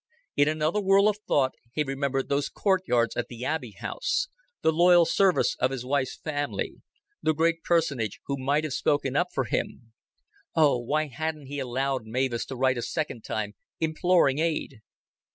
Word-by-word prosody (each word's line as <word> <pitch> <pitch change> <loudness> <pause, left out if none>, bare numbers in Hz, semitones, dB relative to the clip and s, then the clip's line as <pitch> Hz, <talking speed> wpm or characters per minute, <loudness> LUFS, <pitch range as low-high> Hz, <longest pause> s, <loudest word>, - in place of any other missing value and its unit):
In 145 - +4
another 155 +6 +1
whirl 195 +1 +5
of 210 -1 +1
thought 130 -2 +3 0.2
he 150 - +1
remembered 135 -1 -1
those 140 0 0
courtyards 180 - +1
at 120 - -2
the 120 +1 -7
Abbey 130 -9 -3
House, - - -1 0.3
the 160 - +4
loyal 175 +1 +6
service 190 +2 +3
of 130 - +2
his 130 -2 -5
wife's 130 0 -1
family, 145 -2 -3 0.4
the 155 - +1
great 165 +1 +2
personage 140 - 0
who 140 - -1
might 140 +3 0
have 155 -4 -3
spoken 140 -2 0
up 175 +3 +3
for 135 - 0
him. 115 0 -4 0.6
Oh, 150 -6 +4
why 150 +6 0
hadn't 155 +1 -4
he 145 +2 -5
allowed 130 -1 -2
Mavis 120 +1 -1
to 135 - -6
write 130 -1 +2
a - - -2
second 150 -4 -3
time 105 -1 -3 0.3
imploring 160 -3 +2
aid? 155 -7 -2
145 Hz, 170 wpm, -27 LUFS, 130-160 Hz, 0.6 s, loyal